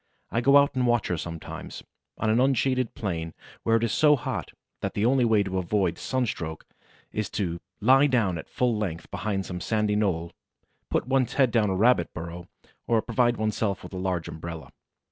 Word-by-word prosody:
I 115 - +1
go 140 +3 +6
out 140 0 +4
and 130 -2 +1
watch 120 -2 +2
her 90 - 0
sometimes 80 -1 -7 0.3
on 110 - +1
an 115 - +3
unshaded 130 -1 +1
plain 85 -6 -3 0.3
where 115 - +2
it 115 - +2
is 115 - +1
so 150 -2 +5
hot 130 - -4 0.3
that - - -4
the 105 - +1
only 125 0 +4
way 110 -3 +4
to 95 -1 -2
avoid 90 -1 0
sunstroke 110 - -2 0.5
is 105 -1 -2
to 85 -4 -2 0.2
lie 135 +6 +6
down 105 - +1
at - - -10
full 125 -2 +1
length 95 -6 -4
behind 100 0 -2
some 90 -1 -5
sandy 105 0 0
knoll, 90 -6 0 0.6
put - - 0
one's 130 -2 +1
head 130 -4 +3
down 110 -3 +2
a 95 - 0
rabbit 110 -3 +3
burrow, 85 +2 -7 0.4
or 115 -2 +2
provide 120 0 +1
one's 110 0 -1
self 100 -4 -1
with - - -10
a - - -4
large 90 -2 -2
umbrella. 80 -4 -7
105 Hz, 195 wpm, -26 LUFS, 90-120 Hz, 0.6 s, go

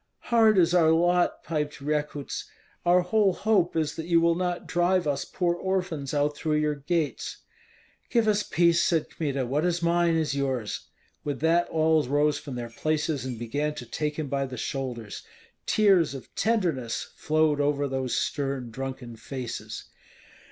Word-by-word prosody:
"Hard 220 -3 +6
is 175 -1 +4
our 165 -3 +5
lot," 175 +2 +2
piped 150 -1 -3
Rekuts. 145 0 -3 0.4
"Our 180 +1 +6
whole 195 +1 +2
hope 195 -4 +1
is 155 -2 0
that 160 0 -5
you 170 -1 +4
will 170 0 +3
not 180 0 -2
drive 175 0 +1
us 145 -2 -1
poor 175 -2 0
orphans 175 -6 -2
out 145 0 +1
through 155 0 -1
your 150 0 +1
gates." 150 +2 -2 0.7
"Give 230 -3 +2
us 210 -1 +3
peace," 170 -3 +3
said 165 -3 +1
Kmita; 140 -4 -2
"what 140 +5 0
is 175 -1 0
mine 170 0 +3
is 155 -3 0
yours." 130 -6 -2 0.4
With 145 -3 -3
that 170 +2 +3
all 160 0 +3
rose 145 +2 +1
from 140 -3 -7
their 120 -1 -5
places 150 0 -1
and 125 -2 -4
began 145 +6 -2
to 125 - -7
take 150 +5 -3
him 155 -2 -2
by 135 0 -1
the 130 -1 -7
shoulders. 125 -5 -4 0.5
Tears 190 -9 +4
of 135 - -10
tenderness 175 - -1
flowed 155 -1 +2
over 145 0 +1
those 130 -2 -2
stern 135 -4 -2
drunken 130 -1 -6
faces. 125 +1 -6
150 Hz, 165 wpm, -27 LUFS, 140-175 Hz, 0.7 s, Hard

